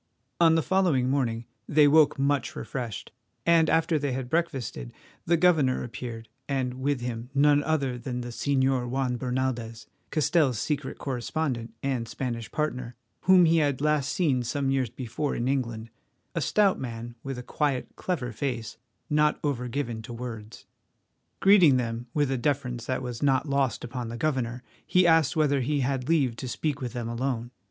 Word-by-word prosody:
On 165 -1 +6
the 165 - +2
following 165 -10 +2
morning 120 -4 0 0.2
they 150 -1 +5
woke 150 0 +5
much 140 0 0
refreshed, 120 -6 -5 0.3
and, 165 -2 +5
after 165 -1 +2
they 140 -2 -1
had 125 0 -4
breakfasted, 135 - -2 0.4
the 170 +1 +4
governor 155 -7 +3
appeared, 115 -2 -7 0.2
and 130 -2 -1
with 140 -2 0
him 120 0 -4
none 145 +1 +5
other 140 -5 -1
than 125 +1 -4
the 120 - -6
Señor 130 -1 +1
Juan 130 -1 0
Bernaldez, 125 -3 -2 0.2
Castell's 150 -4 +2
secret 145 +2 -2
correspondent 125 -3 -3
and 130 -4 -1
Spanish 115 -1 -4
partner, 125 -6 -2 0.3
whom 185 -1 +7
he 165 0 +4
had 145 -4 +1
last 150 -1 +1
seen 150 -9 +1
some 135 +3 -1
years 130 -3 +1
before 125 +4 -3
in 120 - -1
England, 115 -4 -2 0.4
a - - -1
stout 205 -3 +3
man 120 -1 -6
with 135 -2 -5
a 125 - -6
quiet, 140 -1 -1
clever 130 -10 -2
face, 115 -2 -4 0.3
not 150 0 +2
over 130 -4 -1
given 120 -3 -3
to 115 +2 -8
words. 115 -2 -8 0.8
Greeting 185 -9 +7
them 120 0 -3
with 145 -3 +2
a 130 - 0
deference 125 -3 -1
that 130 0 -1
was 120 -2 -5
not 140 +1 +2
lost 140 -2 0
upon 120 -1 -5
the 120 - -5
governor, 125 -3 -1 0.2
he 180 0 +3
asked 165 -4 +4
whether 145 -3 +2
he 145 +3 0
had 130 +1 -1
leave 140 -8 +2
to 130 - -5
speak 145 +3 -2
with 125 -2 -4
them 120 -2 -3
alone. 120 0 -2
130 Hz, 170 wpm, -27 LUFS, 120-150 Hz, 0.8 s, whom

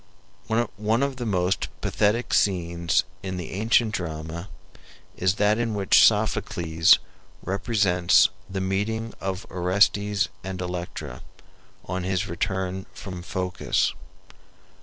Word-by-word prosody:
One 110 +5 +1
of 140 -2 -2
the 120 -2 -3
most 95 -1 0
pathetic 110 +4 0
scenes 85 -3 +2 0.2
in 95 -1 -4
the 90 - -6
ancient 110 +2 +2
drama 80 +1 -5 0.7
is 95 +1 +1
that 105 +1 +2
in 115 -2 -1
which 100 -2 +5
Sophocles 80 -1 +3 0.5
represents 95 -3 +3 0.2
the 95 0 -3
meeting 105 +4 -2
of 95 0 -3
Orestes 100 +3 +2
and 95 -1 -5
Electra, 85 -7 -5 0.6
on 95 0 -3
his 95 -1 -1
return 95 +2 -3
from 90 -3 -7
Phocis. 90 0 -1
95 Hz, 110 wpm, -25 LUFS, 90-105 Hz, 0.7 s, which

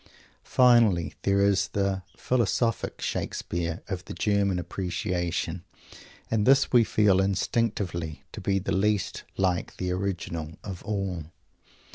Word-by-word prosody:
Finally 115 -10 +4
there 100 0 +2
is 100 -1 +3
the 100 -1 0 0.2
"Philosophical 115 -2 0
Shakespeare" 85 -1 -3
of 95 -2 -4
the - - -7
German 100 -3 +1
appreciation, 90 -1 -2 0.7
and 110 -2 +2
this 135 +1 +5
we 120 -2 +6
feel 100 -3 +3
instinctively 95 -5 -1
to - - -8
be 100 0 +1
the 95 - -2
least 105 -1 0
like 90 -2 0
the 90 -1 -2
original 85 -4 -3
of 95 -4 -6
all! 95 -6 -2
95 Hz, 120 wpm, -27 LUFS, 90-105 Hz, 0.7 s, we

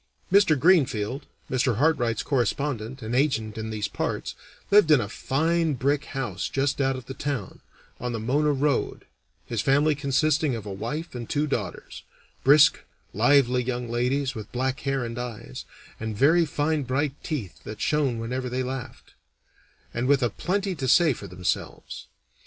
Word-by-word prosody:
Mr. 190 -7 +5
Greenfield, 135 - +2 0.2
Mr. 125 -2 +1
Hartright's 125 -5 +1
correspondent 130 -2 -1
and 110 +2 -3
agent 115 -6 +1
in 110 0 -4
these 105 -2 -2
parts, - - -3 0.4
lived 205 -5 +6
in 150 -3 +7
a 105 - -2
fine 160 +7 0
brick 140 +3 0
house 115 -9 -4
just 135 +1 0
out 135 0 +1
of 130 -2 -8
the 135 - -7
town, 135 -8 -4 0.4
on 125 0 -3
the 115 - -3
Mona 145 +7 +1
Road, 145 +1 0 0.4
his 115 -3 -2
family 145 +5 +3
consisting 145 0 +1
of 110 -3 -7
a 100 - -5
wife 150 - -5
and 120 -2 -6
two 145 +1 +1
daughters 115 -10 -4 0.4
brisk, 150 +1 +6 0.3
lively 125 +2 +4
young 125 -1 -3
ladies 130 +3 0
with 110 -3 -8
black 130 +2 -1
hair 135 -3 -1
and 115 +1 -5
eyes, 115 - -7 0.3
and 110 -1 -4
very 165 +7 +5
fine 150 +1 0
bright 135 +2 -1
teeth 125 - -5
that 105 0 -8
shone 140 -2 +1
whenever 125 +3 -3
they 130 +1 -1
laughed, 130 0 -7 0.8
and 120 +2 -1
with 140 -2 +3
a 120 - +1
plenty 195 - -1
to 135 -6 -3
say 160 +2 +5
for 100 - -9
themselves. 90 0 -4
130 Hz, 165 wpm, -25 LUFS, 115-145 Hz, 0.8 s, in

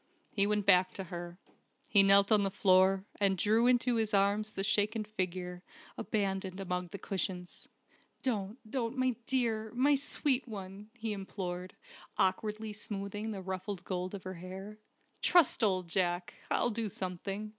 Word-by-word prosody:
He 200 -1 +3
went 210 -1 +1
back 185 -2 +5
to 195 - -4
her. 175 0 -6 0.5
He 200 - +7
knelt 195 +1 +6
on 210 -1 +6
the 195 - +1
floor, 190 0 +4
and 195 -2 +3
drew 220 +6 +3
into 245 -1 +3
his 220 -2 +1
arms 200 +2 +2
the 195 - -2
shaken 215 +1 +2
figure, 180 -3 -4 0.3
abandoned 195 -2 -2
among 180 -1 -2
the 185 - -7
cushions. 185 -2 -4 0.6
"Don't, 215 -4 -2
don't, 235 +1 -2
my 255 -1 +1
dear 225 -4 0
my 275 +4 +4
sweet 275 -1 +1
one!" 200 -1 -8
he 225 -2 -2
implored, 185 -2 -5 0.4
awkwardly 215 +3 0
smoothing 205 +1 -5
the 195 -3 -5
ruffled 190 0 -4
gold 185 +1 -3
of 195 - -8
her 185 - -5
hair. 190 +4 -8 0.4
"Trust 345 -9 +4
old 185 -4 +2
Jack! 175 0 0 0.2
I'll 240 - +1
do 220 -1 -2
something. 195 +3 -4
200 Hz, 155 wpm, -32 LUFS, 185-215 Hz, 0.6 s, He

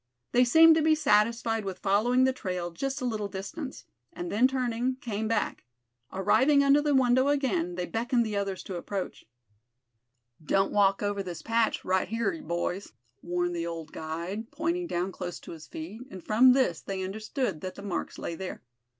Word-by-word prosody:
They 245 +1 +5
seemed 320 +6 +7
to - - +3
be 315 0 +4
satisfied 225 -3 +2
with 190 -2 -5
following 220 +7 +2
the 260 0 +3
trail 180 -7 -4
just 270 +10 -3
a - - -1
little 215 -4 -2
distance; 200 - -7 0.3
and 350 0 -6
then 235 +5 +4
turning, 255 -1 -1
came 220 -5 -3
back. 225 - -1 0.5
Arriving 265 +9 +4
under 280 +1 +5
the 295 -1 +2
window 260 +1 +4
again 210 -12 0
they 180 0 -2
beckoned 235 +3 0
the 215 -1 -3
others 195 -2 -2
to 185 - -5
approach. 190 +2 -5 1.2
"Don't 195 +5 +2
walk 200 -1 +3
over 205 -1 -1
this 180 -3 -7
patch 230 -1 +1
right 185 0 +1
hyar, 230 - -1
boys," 175 - -3 0.3
warned 175 0 -1
the 170 0 -2
old 165 -2 -6
guide, 170 +8 -5
pointing 340 +2 -2
down 180 - -2
close 180 -1 -6
to - - -10
his 160 -2 -10
feet; 180 +9 -8
and 185 -8 -9
from 250 +4 +6
this 250 -11 +1
they 190 -1 -4
understood 215 - -3
that 185 0 -5
the 200 - -10
marks 200 - -4
lay - - -4
there. 185 +2 -6
210 Hz, 180 wpm, -28 LUFS, 185-255 Hz, 1.2 s, seemed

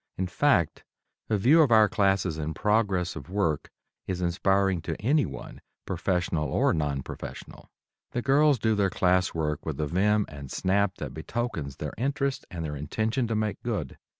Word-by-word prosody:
In 95 - 0
fact, 90 - +1 0.5
a 110 - +2
view 140 +11 +5
of 145 -6 +3
our 110 -1 +7
classes 95 -5 +1
in 80 0 -3
progress 100 -5 +1
of 70 - -8
work 90 -7 0 0.4
is 90 -1 -2
inspiring 95 +1 +1
to - - -4
anyone, 140 +7 -1 0.2
professional 90 -4 -1
or - - +2
non 75 -4 -1
professional. - - -9 0.4
The 120 - -3
girls 145 +1 +4
do 110 0 +1
their 100 -2 +2
class 90 0 +2
work 75 -2 -1
with - - -4
a 75 - +1
vim 105 +6 +2
and 70 -2 -9
snap 100 +1 +1
that - - -6
betokens 80 - -4
their 75 0 -5
interest 140 +1 -1
and 85 -4 -5
their 75 -1 -4
intention 110 - -1
to 115 - -1
make 105 -1 -1
good. 105 - -4
95 Hz, 170 wpm, -27 LUFS, 80-110 Hz, 0.5 s, our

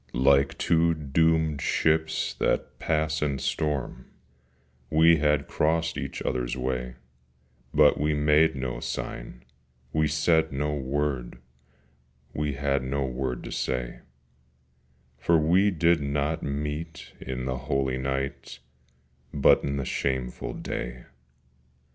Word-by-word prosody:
Like 70 +2 +3
two 85 0 +2
doomed 80 0 +1
ships 80 +2 +1
that - - -1
pass 80 -1 0
in 70 -2 0
storm 75 -1 -2 0.8
We 80 +1 +5
had 75 -2 +1
crossed 80 +1 0
each - - -5
other's 60 0 -2
way: 60 -1 -3 0.8
But 75 0 +5
we 75 +1 +1
made 75 +1 +4
no 65 -2 -3
sign, - - -6 0.5
we 80 0 +2
said 80 +2 +2
no 75 +2 -1
word, 70 -3 -2 1.0
We 75 -1 -1
had 70 0 0
no 70 +1 -1
word 65 -1 -3
to - - -7
say; 60 -1 -3 1.2
For 85 +5 +3
we 90 +6 +4
did 85 -3 +2
not 70 +2 -1
meet 75 +3 -5
in 65 -1 -5
the 65 -1 -2
holy 65 -2 0
night, 65 +1 -3 0.7
But 75 -4 +4
in 70 0 -2
the 70 - -2
shameful 65 -2 -2
day. - - -5
75 Hz, 120 wpm, -26 LUFS, 65-80 Hz, 1.2 s, We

